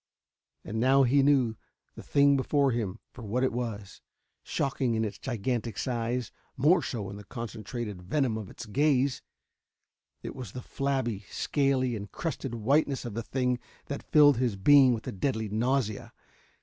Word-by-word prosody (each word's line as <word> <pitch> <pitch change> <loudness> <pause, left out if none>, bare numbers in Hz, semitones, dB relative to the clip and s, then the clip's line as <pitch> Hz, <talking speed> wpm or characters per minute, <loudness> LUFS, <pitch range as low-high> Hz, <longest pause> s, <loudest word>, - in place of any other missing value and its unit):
And 110 +4 -4
now 135 +3 +5
he 135 +3 +4
knew 135 -5 +3 0.4
the - - -10
thing 140 0 +4
before 140 +1 +2
him 110 -4 -2 0.2
for 125 - -11
what 115 +4 -1
it 130 - +1
was. 110 -5 -5 0.4
Shocking 130 -3 -1
in 110 0 +1
its 100 -2 -6
gigantic 120 -2 -2
size, 120 -1 -2 0.3
more 155 +8 +4
so 105 -6 -4
in 100 - -8
the 105 - -10
concentrated 110 -1 -6
venom 125 +5 0
of 110 -3 -6
its 120 - -9
gaze, 135 +3 +1 1.0
it - - -6
was 130 -2 -8
the 125 - -7
flabby, 130 -7 -2
scaly 135 -4 0
and 100 -2 -7
crusted 140 -7 -4
whiteness 135 +4 +1
of 120 - -5
the 115 - -3
thing 125 +1 -1 0.3
that 140 - -5
filled 145 -4 +6
his 120 -4 0
being 130 +5 +6
with 110 - -8
a - - -3
deadly 110 +1 -2
nausea. 115 0 -1
125 Hz, 160 wpm, -28 LUFS, 110-135 Hz, 1.0 s, filled